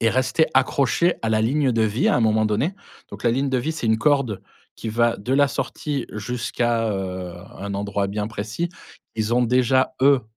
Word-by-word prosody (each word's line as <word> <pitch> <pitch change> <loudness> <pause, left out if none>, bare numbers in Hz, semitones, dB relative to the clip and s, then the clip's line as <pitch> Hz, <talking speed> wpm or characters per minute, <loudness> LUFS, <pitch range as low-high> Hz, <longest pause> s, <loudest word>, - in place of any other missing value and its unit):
est 115 -1 +3
resté 130 +5 +2
accroché 140 +6 +2
à 115 - 0
la 110 0 +2
ligne 135 +4 +2
de 115 - +2
vie 110 +3 +1
à - - +3
un - - +1
moment 110 -1 +3
donné. 140 - 0 0.4
Donc - - -9
la 120 - +4
ligne 135 +4 0
de 130 -1 +1
vie, 155 +6 -2
c'est 140 -7 -4
une 110 0 +3
corde 135 -6 +1 0.3
qui 115 - -5
va 115 +1 +2
de 115 +6 -3
la 140 +1 +4
sortie 145 -2 -3
jusqu'à, 120 +1 -1
heu, 95 -3 -4 0.2
un 100 0 -5
endroit 100 0 -1
bien 105 +1 -2
précis. 110 +9 -3 0.5
Ils 110 +1 0
ont 125 - +3
déjà 130 +2 +2
eux, 135 -1 +5
115 Hz, 205 wpm, -23 LUFS, 110-135 Hz, 0.5 s, eux